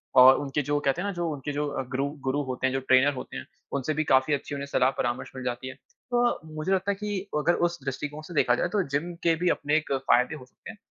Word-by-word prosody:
और 130 +1 +9
उनके 140 +1 -1
जो 145 0 +2
कहते 135 +5 +1
हैं - - -3
ना 200 - -2
जो 175 -1 -2
उनके 145 0 -4
जो 145 +1 -1 0.3
गुरु 135 +1 0 0.2
गुरु 140 +2 +1
होते 130 0 -1
हैं 130 - -2
जो 135 - +1
ट्रेनर 130 +2 +4
होते 130 - -7
हैं, - - -7 0.3
उनसे 140 +3 -1
भी 155 +1 0
काफ़ी 130 +1 +3
अच्छी 145 0 -3
उन्हें 140 0 -4
सलाह 130 -2 +3
परामर्श 120 +1 -2
मिल 130 - -6
जाती 125 +1 -3
है। 130 - -6 0.4
तो 240 0 +2 0.2
मुझे 155 +5 -2
लगता 190 +1 +1
है - - -2
कि 205 0 -3 0.2
अगर 165 +3 +3
उस 170 0 -7
दृष्टिकोण 145 +3 -4
से - - -7
देखा 125 -5 +3
जाये 175 - 0
तो 200 +2 +1
जिम 165 +5 -1
के 165 -1 +4
भी 180 - +4
अपने 145 -1 +1
एक 155 - -3
फ़ायदे 135 +1 +2
हो 130 -4 -11
सकते 125 - -14
हैं, 225 - -15
145 Hz, 265 wpm, -27 LUFS, 130-170 Hz, 0.4 s, और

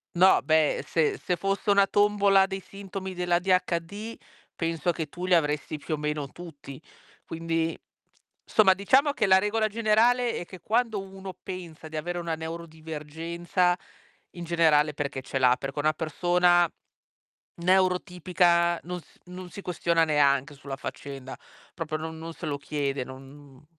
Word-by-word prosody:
No 185 +2 +6
beh 155 -1 +2
se 160 -2 +1
se 180 - 0
fosse 195 +3 -2
una 200 -1 +6
tombola 200 -1 +4
dei 195 0 -4
sintomi 195 -1 -7
dell'ADHD 180 +3 0 0.4
penso 165 0 -1
che 160 -2 -4
tu 180 +4 -6
li 185 -1 +4
avresti 150 -1 0
più 150 +2 -5
o - - -8
meno 150 -1 -2
tutti. 145 -4 -11 0.4
Quindi 165 0 -2 0.7
insomma 200 -3 +5
diciamo 260 +10 +3
che 215 - +1
la 190 - +7
regola 215 +2 +1
generale 230 +3 +2
è 175 - -6
che 185 0 -12
quando 225 -1 0
uno 190 0 -9
pensa 175 -3 -8
di 155 - -6
avere 175 +3 -3
una 165 -1 -2
neuro-divergenza, 165 +2 -2 0.5
in 175 - -8
generale 160 -3 +3
è - - -19
perché 140 -2 -3
ce 130 - -4
l'ha. 125 -1 +5
Perché 135 +1 -6
una 155 +1 +2
persona 175 +2 +3 0.9
neuro-tipica 180 -1 +2
non 180 +1 -5
s - - -22
non 180 0 -9
si 200 - -9
questiona 170 -2 +1
neanche 145 -2 +2
sulla 140 0 -7
faccenda, 135 -1 -7 0.4
proprio 160 -3 -4
non 160 +1 -6
non 165 +1 -7
se 170 - -8
lo 145 -1 -2
chiede, 140 -2 -2
non 135 +1 -13
170 Hz, 150 wpm, -27 LUFS, 155-190 Hz, 0.9 s, la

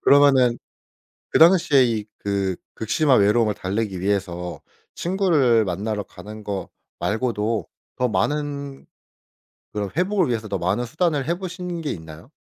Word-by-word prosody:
그러면은 135 -4 +5 0.7
그 - - +3
당시에 165 -5 +6
이 115 -3 -1 0.2
그 100 -2 -1 0.2
극심한 130 +4 +2
외로움을 105 +1 +3
달래기 100 0 -3
위해서 90 -3 -2 0.3
친구를 160 - +2
만나러 105 +3 -2
가는 105 +2 -11
거 100 -2 -4 0.3
말고도 110 -2 -1 0.3
더 125 0 +1
많은 140 +6 -2 0.9
그런 105 -1 -2
회복을 185 -1 +2
위해서 115 -3 -2
더 100 -1 -2
많은 95 +7 0
수단을 150 +2 0
해보신 180 0 -4
게 155 -3 -3
있나요? 80 - -10
115 Hz, 285 characters per minute, -23 LUFS, 100-145 Hz, 0.9 s, 당시에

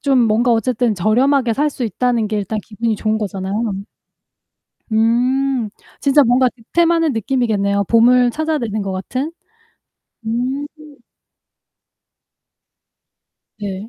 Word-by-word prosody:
좀 270 -3 +2
뭔가 230 +2 +2
어쨌든 230 0 +1
저렴하게 240 +6 +2
살 295 +5 +1
수 260 -3 -4
있다는 230 +1 0
게 210 0 -2
일단 210 +2 -3
기분이 220 0 -2
좋은 215 +1 -1
거잖아요. 200 +1 -3 1.2
음. 245 +2 +1 0.3
진짜 285 +1 +4
뭔가 250 0 +3
득템하는 330 +6 +1
느낌이겠네요 215 -4 0
보물 245 +2 +5
찾아내는 250 -9 -2
것 195 -1 -3
같은. 255 - -4 0.9
음. 255 +5 -2 2.9
네. 200 +1 -6
235 Hz, 230 characters per minute, -18 LUFS, 215-260 Hz, 2.9 s, 보물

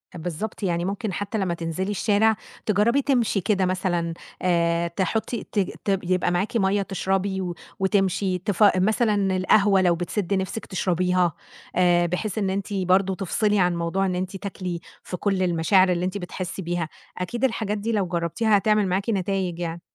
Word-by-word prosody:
بالضبط، 175 +6 -5
يعني 175 -2 0
ممكن 200 +1 -3
حتّى 205 +5 -3
لمّا 190 -4 0
تنزلي 170 +4 -3
الشارع 215 +1 +3 0.3
تجرّبي 220 +6 +3
تمشي 245 -7 +1
كده 190 0 +1
مثلًا 175 -2 -1 0.3
آآ، 170 -1 +2
تحطّي 200 +7 -2
ت 210 - 0 0.3
ت 195 -2 +2
يبقى 180 0 +1
معاكِ 200 +7 0
مَيَّة 200 -1 +2
تشربي 190 0 -1
و 175 -2 -3 0.2
وتمشي، 190 -1 +1
تفا 195 +1 +3
مثلًا 205 -2 +2
القهوة 195 +1 +4
لو 175 -2 +3
بتسد 180 +3 -2
نفسِك 190 +3 -2
تشربيها، 180 -2 +1 0.4
آآ، 175 -1 +4
بحيث 180 +4 -2
إن 195 -3 0
أنتِ 200 +1 -3
برضه 190 0 +2
تفصلي 205 +2 +1
عن 180 -1 +3
موضوع 170 +3 0
إن 185 -1 -1
أنتِ 185 +2 -3
تاكلي 185 -3 -5 0.2
في 180 - -5
كل 195 0 0
المشاعر 185 +2 +3
اللي 175 0 0
أنتِ 185 +2 -2
بتحسّي 185 0 -5
بيها. 175 -2 -2 0.3
أكيد 230 +8 -4
الحاجات 220 -4 0
دي 215 +3 -2
لو 205 -4 +1
جربتيها 175 +6 +1
هتعمل 210 -1 +2
معاكِ 195 +5 -1
نتايج 190 -3 -1
يعني. 170 0 -4
190 Hz, 165 wpm, -24 LUFS, 175-205 Hz, 0.4 s, القهوة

